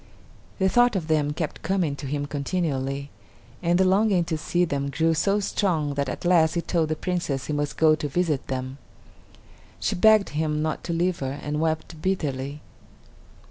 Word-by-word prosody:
The 190 - +2
thought 245 +3 +4
of 170 -5 -2
them 150 -2 +1
kept 150 0 -4
coming 180 -7 0
to 140 - -6
him 145 +1 -2
continually, 140 -2 -2 0.5
and 175 0 +2
the 190 - +4
longing 195 -1 +3
to 165 - -2
see 175 +3 0
them 140 -3 -2
grew 165 +4 +1
so 195 +6 +1
strong 170 -7 0
that 140 -1 -1
at - - -6
last 170 -2 +4
he 170 - +1
told 165 -2 0
the 155 - 0
Princess 155 -6 -2
he 150 - -3
must 145 0 -2
go 155 -1 +5
to 155 -1 -2
visit 155 -2 0
them. 130 +1 -4 1.0
She - - 0
begged 215 +2 +5
him 150 0 -1
not 155 -1 -2
to 170 - -2
leave 175 +1 0
her 135 +1 -4
and 150 +1 -2
wept 160 0 -2
bitterly. 145 -6 -2
155 Hz, 180 wpm, -25 LUFS, 145-180 Hz, 1.0 s, go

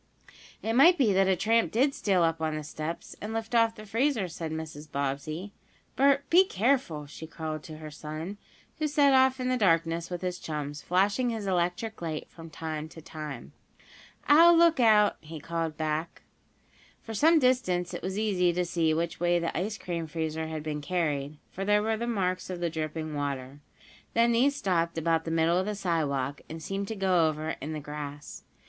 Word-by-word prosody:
"It 225 - -1
might 330 +9 +7
be 235 -9 +3
that 190 0 +3
a 190 - +3
tramp 225 +5 +2
did 270 +5 +2
steal 190 -8 +1
up 165 -1 0
on 155 -1 -1
the 155 - -4
steps, 155 +3 -6
and 215 +2 -5
lift 225 +1 -4
off 230 -1 +3
the 215 - -10
freezer," 230 -1 0
said 165 -1 -6
Mrs. 155 -1 -7
Bobbsey. 140 +7 -3 0.4
"Bert, 275 +1 +3
be 360 +3 +8
careful," 220 - 0
she 150 +2 -10
called 155 -2 -5
to 155 -1 -9
her 155 -1 -9
son, 155 +6 -7 0.4
who 310 - +1
set 285 -2 +4
off 260 0 +4
in 255 - -1
the 255 0 +1
darkness 165 -4 +1
with 180 0 -5
his 180 -1 -2
chums, 150 -1 -5
flashing 200 +7 +1
his 225 -3 -3
electric 180 +4 -1
light 160 -2 -4
from 165 -1 -11
time 155 0 -5
to 165 - -12
time. 155 -5 -8 0.8
"I'll 335 +4 +8
look 335 -3 +5
out!" 215 -3 +5
he 155 +1 -9
called 165 -1 -3
back. 155 +2 -3 0.8
For 225 - -7
some 320 +9 +5
distance 245 - +1
it - - -5
was 190 +2 -4
easy 190 -5 +2
to 180 +1 0
see 165 -2 +1
which 170 +1 -2
way 175 0 +2
the 170 -1 -2
ice 205 +6 -2
cream 170 -4 -4
freezer 160 0 -3
had 155 -1 -5
been 150 -1 -3
carried, 150 -3 -2
for 195 - -5
there 210 +1 +3
were 220 0 +1
the 235 +2 -3
marks 185 -6 -1
of 180 -1 -4
the 170 -1 -1
dripping 155 0 -4
water. 140 -1 -4 0.6
Then 235 +1 +4
these 265 +5 +3
stopped 170 -9 0
about 165 0 +1
the - - -3
middle 165 +2 +2
of 190 - -2
the 210 - -2
sidewalk, 145 -8 -1
and 160 - -6
seemed 195 +5 -4
to 220 - -4
go 185 -5 +3
over 155 +1 -3
in 150 +3 -4
the 155 - -4
grass. 145 0 -7
175 Hz, 195 wpm, -28 LUFS, 155-220 Hz, 0.8 s, be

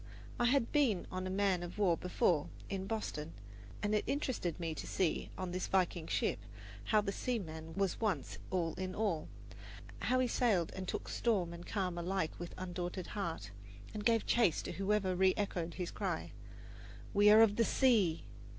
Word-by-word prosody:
I 240 - +3
had 245 -1 +3
been 260 - +2
on 185 0 -3
a - - -3
man 190 -2 +1
of 175 +2 -6
war 190 -5 +4
before, 170 -3 +1 0.2
in 195 -1 -3
Boston, 165 -8 -3 0.5
and 210 0 +1
it 210 - +2
interested 250 - -1
me 165 -2 -2
to - - -6
see, 180 -4 0
on 185 -1 -3
this 185 +1 -2
Viking 180 -3 +1
ship, - - 0 0.5
how 215 - +4
the 200 -1 -2
seaman 165 -9 -4
was 195 +1 0
once 185 - -1
all 170 -3 0
in 185 0 -3
all 195 -8 0 0.7
how 255 - +1
he 255 -1 +3
sailed 210 -9 +2
and 190 -1 -5
took - - -3
storm 190 -8 0
and 170 +1 -9
calm 185 -4 -1
alike 180 -1 -1
with 175 0 -6
undaunted 180 0 -4
heart, 165 - -3 0.4
and 210 - -4
gave 230 0 +3
chase 230 -9 +3
to - - -4
whosoever 195 -1 +1
reechoed 185 -2 +1
his 180 -2 -3
cry, - - -3 0.8
"We 205 +1 +6
are 215 +1 +9
of 205 -2 +3
the 230 - +5
sea!" 215 -10 +3
190 Hz, 175 wpm, -35 LUFS, 175-210 Hz, 0.8 s, are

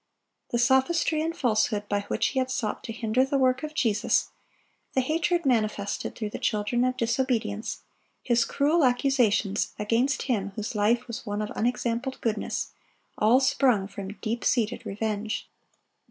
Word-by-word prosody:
The 240 - 0
sophistry 265 +6 +2
and 330 +2 -2
falsehood 215 -3 +1
by 205 0 0
which - - +1
he 265 - -1
had 255 0 0
sought 230 -4 -2
to - - -5
hinder 230 +2 +1
the 275 +1 0
work 255 -1 +2
of 305 0 -6
Jesus, 215 -7 +1 0.6
the 260 - +3
hatred 330 +4 0
manifested 215 -5 0
through 215 -2 -4
the - - -5
children 215 +3 0
of 255 0 0
disobedience, 230 -2 -1 0.4
his 240 -1 +3
cruel 300 +6 +2
accusations 245 -6 +2
against 230 +6 +1
Him 200 -6 -1
whose 215 0 -4
life 230 +4 +2
was 235 +1 -7
one 205 0 -2
of 210 - -5
unexampled 240 +2 -1
goodness, 215 -3 -2 0.5
all 225 +5 +5
sprung 260 -7 +2
from 200 0 -7
deep 230 +1 -2
seated 235 0 0
revenge. 215 +1 -3
235 Hz, 155 wpm, -27 LUFS, 215-260 Hz, 0.6 s, all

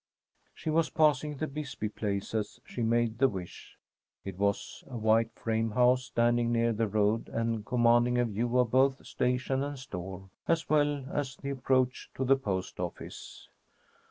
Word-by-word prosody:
She 155 - -3
was 160 0 +2
passing 150 -2 +2
the 155 - -1
Bisbee 140 -6 -4
place 100 -1 -3
as 105 -2 -2
she 120 - -6
made 115 0 +1
the 135 0 +5
wish. 90 -5 -8 0.5
It 95 -2 -5
was 100 0 -1
a 125 - -6
white 110 +1 +3
frame 115 0 -1
house 125 +3 +3
standing 120 -1 +2
near 115 0 +2
the 110 +1 0
road, 105 +2 +1
and 115 -1 -1
commanding 120 +1 +3
a 120 - +3
view 120 +3 -1
of 125 -3 +3
both 135 +1 +3
station 125 +1 0
and 145 0 -3
store, 95 -6 -7 0.2
as 165 0 +1
well 145 -2 +2
as 135 -3 -2
the 140 +1 -5
approach 130 -1 0
to 130 - -1
the 135 +2 +5
post 100 -8 -3
office. - - -7
120 Hz, 165 wpm, -30 LUFS, 110-135 Hz, 0.5 s, the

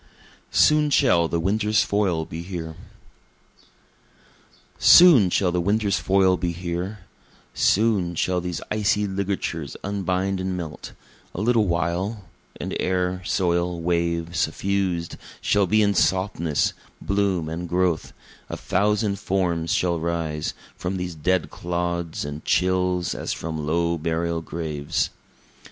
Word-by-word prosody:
Soon 150 -1 +4
Shall 115 - +3
the 85 - -1
Winter's 105 +4 +2
Foil 95 -6 0
Be 80 +1 -7
Here 85 -3 -6 2.0
Soon 155 - +8
shall 90 0 +1
the 90 0 0
winter's 100 -1 +1
foil 95 +1 +3
be 85 -1 -2
here; 90 +4 -4 0.5
Soon 100 -5 +2
shall 90 +2 0
these 90 -2 -4
icy 105 -1 +1
ligatures 95 -6 -3
unbind 95 -1 -1
and 95 0 -2
melt 80 -4 -7 0.4
A - - -4
little 115 -2 +3
while, 90 +5 -1 0.4
And - - -4
air, 90 0 0
soil, 85 -1 0
wave, 85 0 -1
suffused 95 -4 -1 0.2
shall 100 -2 +2
be 110 +3 +3
in 100 0 +2
softness, 95 -5 +1 0.3
bloom 100 -5 0
and 85 +2 -5
growth 90 -2 0 0.4
a - - -4
thousand 105 0 0
forms 85 -4 -1
shall 85 -2 +1
rise 80 -2 -2 0.2
From 95 +1 -3
these 90 -1 -4
dead 90 +3 0
clods 85 -2 -3
and 75 +1 -6
chills 90 -1 +1
as - - -3
from 80 -2 -5
low 85 +1 0
burial 85 +1 -1
graves. 75 -3 -3
90 Hz, 125 wpm, -23 LUFS, 85-100 Hz, 2.0 s, Soon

